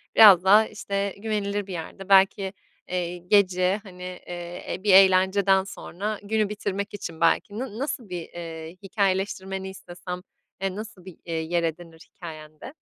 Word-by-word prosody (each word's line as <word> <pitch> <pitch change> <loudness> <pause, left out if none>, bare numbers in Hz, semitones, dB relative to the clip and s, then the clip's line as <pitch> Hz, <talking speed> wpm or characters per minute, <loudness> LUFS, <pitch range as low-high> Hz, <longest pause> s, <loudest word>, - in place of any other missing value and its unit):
biraz 195 -5 +9
daha, 210 +3 +6
işte, 200 -1 -3
güvenilir 205 -2 -2
bir 190 - -6
yerde 185 +3 -7
belki, 195 0 +4 0.4
eee, 180 -1 -2
gece, 185 +1 +2
hani, 180 -3 -11
eee, 175 -1 -7
e, 185 - -7
bir 205 -3 +4
eğlenceden 190 0 +5
sonra, 200 +1 -5
günü 215 0 0
bitirmek 200 -1 -3
için 170 -5 -7
belki 200 +6 +2
na 240 -5 -5
nasıl 260 -6 -3
bir, 175 -1 -4
eee, 165 -1 -8
hikâyeleştirmeni 190 -1 -1
istesem, 180 -1 -8 0.4
eee, 195 -1 -1
nasıl 210 -3 -9
bir, 185 -3 -11
eee, 170 - -5
yer 165 +1 -1
edinir 165 0 -6
hikâyende? 155 - -10
190 Hz, 150 wpm, -25 LUFS, 175-200 Hz, 0.4 s, biraz